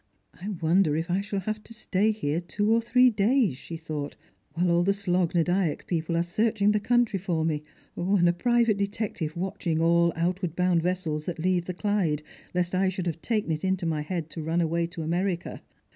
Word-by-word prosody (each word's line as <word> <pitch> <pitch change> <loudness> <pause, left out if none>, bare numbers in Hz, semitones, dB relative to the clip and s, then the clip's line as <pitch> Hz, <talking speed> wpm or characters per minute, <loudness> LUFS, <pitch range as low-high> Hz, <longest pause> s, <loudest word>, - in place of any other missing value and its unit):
" - - -46
I 195 - -4
wonder 170 -3 +2
if 165 +3 -2
I 190 +2 +2
shall 200 -1 -3
have 215 +2 -3
to 230 - -13
stay 210 0 +1
here 170 -7 -1
two 205 +5 0
or 230 - +3
three 250 +2 +4
days," 215 - +2
she 165 +5 -7
thought, 150 -3 -5 0.2
" - - -40
while 175 +1 +2
all 170 0 +4
the 195 +3 +3
Slogh 180 -3 0
na 170 - +4
Dyack 175 -2 0
people 165 -1 -1
are 170 - +2
searching 210 +3 +1
the 210 - +2
country 240 -2 +2
for 170 -4 -1
me, 155 -2 0 0.3
and 180 0 +2
a 175 - +4
private 235 +2 +2
detective 200 -6 -3
watching 175 -3 -2
all 170 +1 +4
outward 175 0 -1
bound 180 -2 +2
vessels 165 -4 -2
that 175 - -3
leave 175 +1 +1
the 180 - -5
Clyde, 180 -8 0 0.3
lest 180 0 0
I 190 +1 +2
should 185 -1 -4
have 165 -2 -3
taken 215 -7 -1
it 155 -1 -2
in 190 0 +1
my 155 -2 -1
head 165 0 -4
to 165 - -5
run 165 +2 0
away 170 0 +1
to 170 -1 -6
America 175 +2 -2
180 Hz, 215 wpm, -27 LUFS, 165-200 Hz, 0.3 s, three